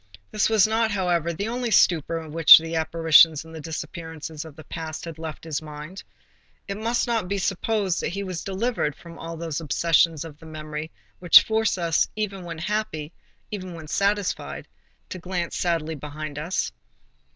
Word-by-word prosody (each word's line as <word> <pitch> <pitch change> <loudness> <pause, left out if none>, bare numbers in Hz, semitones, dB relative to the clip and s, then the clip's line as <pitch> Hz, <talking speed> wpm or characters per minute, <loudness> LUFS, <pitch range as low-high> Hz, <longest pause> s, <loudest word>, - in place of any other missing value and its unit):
This 210 - +2
was 220 -2 +5
not, 220 +1 +1
however, 175 -5 0
the 195 +6 -3
only 240 +1 -2
stupor 165 -5 +2
which 160 +1 +9
the 165 +1 -3
apparitions 160 -1 +5
and 160 - -13
the 160 - -7
disappearances 160 -1 -6
of 155 -3 -12
the 155 - -11
past 160 -1 -6
had 165 -2 -8
left 160 0 -7
in - - -8
his 150 -1 -2
mind. 155 +5 -9 0.6
It 200 0 -4
must 230 +3 0
not 230 -5 -1
be 200 +2 -1
supposed 195 0 0
that - - -1
he 200 +3 -4
was 185 -3 -5
delivered 195 - -1
from 170 -1 -13
all 165 0 -6
those 165 -1 -4
obsessions 165 0 +2
of 150 -2 -11
the 160 - -13
memory 155 0 -6 0.3
which 175 -1 +8
force 220 -2 +1
us, 165 -2 +1
even 200 -3 -3
when 165 -1 -6
happy, 170 -4 -3 0.4
even 185 -4 -6
when 160 -2 -9
satisfied, 200 +4 -1 0.4
to 185 - -6
glance 175 -1 -3
sadly 165 -3 -1
behind 150 0 -6
us. 170 +5 -2
165 Hz, 175 wpm, -24 LUFS, 160-195 Hz, 0.6 s, which